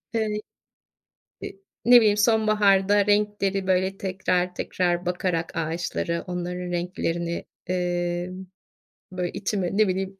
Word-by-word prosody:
ııı, 220 -1 +1 1.2
ı - - -3 0.4
ne 245 +1 +8
bileyim, 210 -2 +3
sonbaharda 205 -2 +3
renkleri, 205 -2 +1
böyle, 190 +1 +1
tekrar 185 -1 -1
tekrar 175 -1 -1
bakarak 180 -2 -1
ağaçları, 170 +1 -2
onların 180 0 -4
renklerini, 170 -1 -2 0.3
ııı, 175 +1 -2 0.7
böyle, 180 -1 -3
içime, 195 -3 -2
ne 215 -2 +5
bileyim, 190 +1 -2
185 Hz, 105 wpm, -25 LUFS, 175-200 Hz, 1.2 s, ne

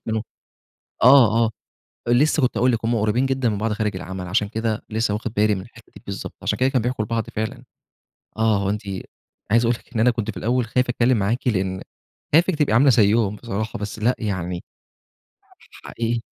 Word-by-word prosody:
منهم 110 -1 -1 0.8
آه، 115 -3 +6
آه، - - 0 0.6
لسه 145 +5 +3
كنت 125 - +1
هاقول 125 +2 +3
لِك 115 -1 -2
هُم 120 +1 +1
قريبين 110 +4 +1
جدًا 130 -3 0
من 105 - -2
بعض 110 +1 -1
خارج 105 -2 -2
العمل، 95 -1 -6
عشان 100 +2 +1
كده 110 -1 -2
لسه 110 -1 0
واخد 110 +1 -4
بالي 105 0 +2
من 95 - -5
الحته - - -16
دي - - -13
بالضبط، - - -6
عشان - - -1
كده 130 +1 +2
كانوا 130 -4 0
بيحكوا 120 -3 -1
البعض 115 0 -2
فعلًا، 120 +4 -4 0.7
آه، 110 -2 +3
هو 95 - 0
أنتِ 105 +1 -2 0.7
عايز 115 +1 +4
أقول 120 - +2
لِك - - -23
إن - - 0
أنا 120 +2 +5
كنت 115 -3 -3
في - - -11
الأول 120 +1 0
خايف 125 +2 0
أتكلم 120 -1 +2
معاكِ؛ 115 +6 -1
لأن 95 -4 0 0.5
خايفِك 170 +2 +4
تبقى 145 -6 +1
عاملة 135 +5 +5
زيهم 105 -3 +3
بصراحة، 110 -1 -4
بس 105 +1 -5
لأ 120 +4 +2
يعني 90 -5 -3 1.2
حقيقي 115 0 -2
115 Hz, 195 wpm, -22 LUFS, 105-125 Hz, 1.2 s, آه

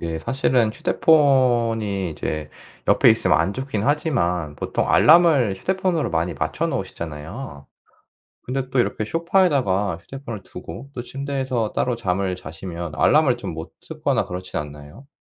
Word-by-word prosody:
이게 80 -1 -3
사실은 125 +3 +1
휴대폰이 120 - +2
이제 75 -1 -4 0.4
옆에 - - +6
있으면 - - +3
안 95 - +1
좋긴 130 -4 -3
하지만 90 - 0
보통 - - -2
알람을 155 - +5
휴대폰으로 185 - -1
많이 85 +1 -1
맞춰 - - -2
놓으시잖아요. 80 - -6 0.8
근데 130 +1 -3
또 135 - -1
이렇게 110 - -1
소파에다가 135 - +1
휴대폰을 115 0 -8
두고 95 +12 -9
또 120 - -4
침대에서 130 -4 -3
따로 125 - 0
잠을 95 -4 -1
자시면 85 -1 -7
알람을 145 - +4
좀 - - -6
못 80 +1 -7 0.2
듣거나 - - 0
그렇지 90 +1 -6
않나요? 75 - -7
115 Hz, 335 characters per minute, -22 LUFS, 85-135 Hz, 0.8 s, 옆에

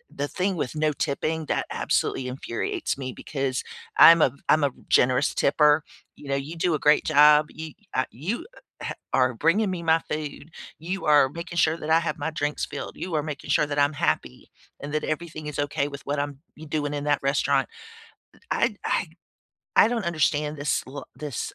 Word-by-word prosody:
the 145 - -2
thing 185 +4 -1
with 150 -5 -3
no 155 0 +1
tipping 155 +1 -2
that - - 0
absolutely 125 - -1
infuriates 125 +1 -3
me 130 -1 -4
because 135 -3 -3 0.3
I'm 165 0 +9
a - - +5
v 135 - -19
I'm 155 0 +5
a 140 - +3 0.2
generous 125 +3 +3
tipper, 150 +1 +3 0.3
you 145 - -13
know, 140 - +1
you 140 +4 -4
do 165 0 +1
a - - -3
great 150 +1 +4
job, 150 0 +6
you 160 0 -8 0.2
uh, 130 - +2
you, 200 - -4 0.4
heh, - - -4 0.2
are 130 -1 +3
bringing 185 - +2
me 180 -2 -4
my 165 0 +4
food, 150 +1 -5 0.3
you 180 +5 -4
are 145 -3 +5
making 170 +3 -7
sure 160 0 +3
that 155 -1 -6
I 160 +1 +5
have 170 0 -3
my 145 +2 -1
drinks 150 -1 -2
filled, - - -7
you 180 -3 -4
are 150 - +1
making 150 -2 -7
sure 150 - +3
that 145 0 -2
I'm 145 +1 +3
happy, 65 - -2 0.3
and 145 +1 -6
that 155 - 0
everything 155 -1 -4
is 150 - -5
okay 145 0 0
with 140 -1 -8
what 145 +1 -1
I'm 145 -1 -4 0.2
y 155 - -10
doing 145 -1 -1
in 145 0 -3
that 145 -1 +2
restaurant, 140 +1 +1 0.8
i - - +1
I - - +2
I - - -9 0.7
I - - +7
don't 230 -3 -2
understand 155 -2 0
this 145 +1 0
l 135 +2 -8
this, 145 -5 -5
150 Hz, 200 wpm, -25 LUFS, 140-160 Hz, 0.8 s, I'm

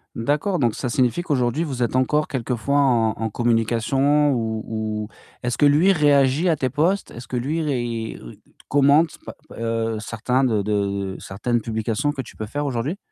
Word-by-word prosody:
D'accord, 145 - 0
donc 120 -7 +1
ça 125 - -3
signifie 125 +5 +1
qu'aujourd'hui 140 -2 0
vous 135 -6 -2
êtes 120 - -1
encore 150 +4 +2
quelquefois 130 +2 -1
en 120 -5 +3
en 110 0 -2
communication 120 +6 +2
ou 110 -3 -2
ou 110 -1 -3 0.4
est-ce 120 0 -1
que 145 - +5
lui 150 +7 +5
réagit 145 0 +3
à 165 - +3
tes 130 -3 -1
posts? 170 +8 0
Est-ce 120 +1 -10
que 125 - -3
lui 145 +7 -1
ré 120 -6 -3 0.5
commente 145 +3 +3
pa - - -8 0.2
heu, 115 -1 -1
certains 120 +4 -1
de 110 -5 +2
de 100 -2 -1
certaines 120 +5 -2
publications 110 +5 -1
que 140 -2 -4
tu - - -14
peux 110 - -5
faire 145 +6 -3
aujourd'hui? 135 +6 -2
125 Hz, 175 wpm, -22 LUFS, 115-145 Hz, 0.5 s, que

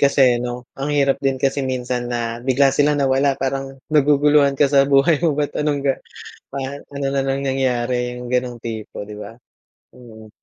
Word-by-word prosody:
kasi, 130 -3 +4
'no? 125 0 -5
Ang 135 +2 -3
hirap 140 -1 +2
din 135 -1 +1
kasi 135 +2 0
minsan 125 -2 -3
na 115 -1 -3
bigla 135 +1 +3
sila 145 +1 +3
nawala 135 0 +2
parang 135 0 -3 0.2
naguguluhan 145 -1 +4
ka 145 - +5
sa 140 0 +4
buhay 140 +3 +4
mo 160 -4 +1
ba't 145 - -1
anong 150 -1 0
ga 135 -1 +2 0.6
pa - - -4 0.4
ano 140 0 -2
na 135 0 0
nang 135 +1 -1
nangyari, 125 -2 -1
'yong 125 0 -8
gano'ng 125 -1 -1
tipo, 110 -3 -6
'di 105 0 -9
ba, 105 +1 -8 0.6
mm. 110 -3 -14
135 Hz, 180 wpm, -20 LUFS, 125-140 Hz, 0.6 s, ka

